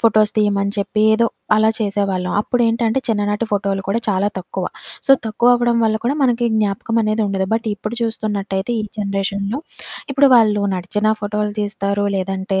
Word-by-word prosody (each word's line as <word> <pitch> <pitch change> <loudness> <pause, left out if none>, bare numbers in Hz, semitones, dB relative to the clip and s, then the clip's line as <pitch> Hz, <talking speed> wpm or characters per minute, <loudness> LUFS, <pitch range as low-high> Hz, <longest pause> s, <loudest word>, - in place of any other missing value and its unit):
Photos 215 -1 +4
తీయమని 200 -1 +1
చెప్పి, 205 +1 0
ఏదో 230 +2 +3 0.3
అలా 215 +1 +4
చేసేవాళ్ళం. 195 -3 -1
అప్పుడేంటంటే, 230 +1 +1
చిన్ననాటి 205 0 0
ఫోటోలు 195 -1 0
కూడా 215 +4 +1
చాలా 200 0 +1
తక్కువ. 185 0 -5 0.4
సో, - - +1 0.2
తక్కువవ్వడం 240 +2 +3
వల్ల 220 0 +2
కూడా 255 +4 +1
మనకి 240 -2 +2
జ్ఞాపకమనేది 215 +1 0
ఉండదు, 195 -1 -1
బట్ 230 0 -2
ఇప్పుడు 210 +3 -5
చూస్తున్నట్టయితే 205 -2 -2
ఈ - - -2 0.2
జనరేషన్‌లో, 200 +4 -2 0.5
ఇప్పుడు 275 0 +5
వాళ్ళు 215 -3 +4
నడిచిన 210 +4 0
ఫోటోలు 210 0 -2
తీస్తారు, 205 0 -1
లేదంటే 190 0 -2
210 Hz, 145 wpm, -19 LUFS, 200-225 Hz, 0.5 s, ఇప్పుడు